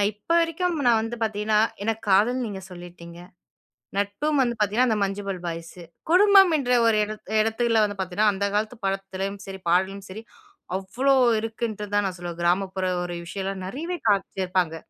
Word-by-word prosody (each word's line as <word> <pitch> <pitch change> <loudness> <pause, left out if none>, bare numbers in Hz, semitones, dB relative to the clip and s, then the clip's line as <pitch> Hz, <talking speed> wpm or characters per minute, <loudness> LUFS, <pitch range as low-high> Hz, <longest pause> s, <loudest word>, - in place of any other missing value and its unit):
அ - - +3
இப்ப 210 +10 -32
வரைக்கும் 335 +1 -1
நான் 230 -2 +5
வந்து 230 +1 -4
பார்த்தீங்கன்னா, 215 0 +1 0.2
எனக்கு 225 +1 -2
காதல் 220 +7 +4
நீங்க 195 -2 -6
சொல்லிட்டீங்க. 175 -1 -11 0.8
நட்பும் 270 +9 0
வந்து 240 -1 0
பார்த்தீங்கன்னா 215 +5 +2
அந்த 220 -2 +1
'மஞ்சுமல் 195 -2 -3
பாய்ஸு'. 170 +1 -7 0.3
குடும்பம் 385 -1 +6
என்ற 250 -3 -1
ஒரு 225 -1 +4
இடத் 215 -1 -9
இடத்துல 225 0 +2
வந்து 205 -1 -3
பார்த்தீங்கன்னா, 190 +3 +1
அந்த 200 +1 -1
காலத்து 215 +3 -1
படத்துலயும் 195 0 -3
சரி 190 -1 -8
பாடலும் 190 +2 0
சரி 215 +4 -8 0.5
அவ்ளோ 255 +9 +1 0.3
இருக்குன்ட்டு 225 -2 -4
தான் 205 0 +3
நான் 185 -1 -4
சொல்லுவேன். 175 -1 -7
கிராமப்புற 185 +2 0 0.2
ஒரு 175 -1 -5
விஷயம்லாம், 195 +1 -4
நெறையவே 330 - -4
காமிச்சிருப்பாங்க. 185 -4 0
205 Hz, 155 wpm, -24 LUFS, 190-230 Hz, 0.8 s, குடும்பம்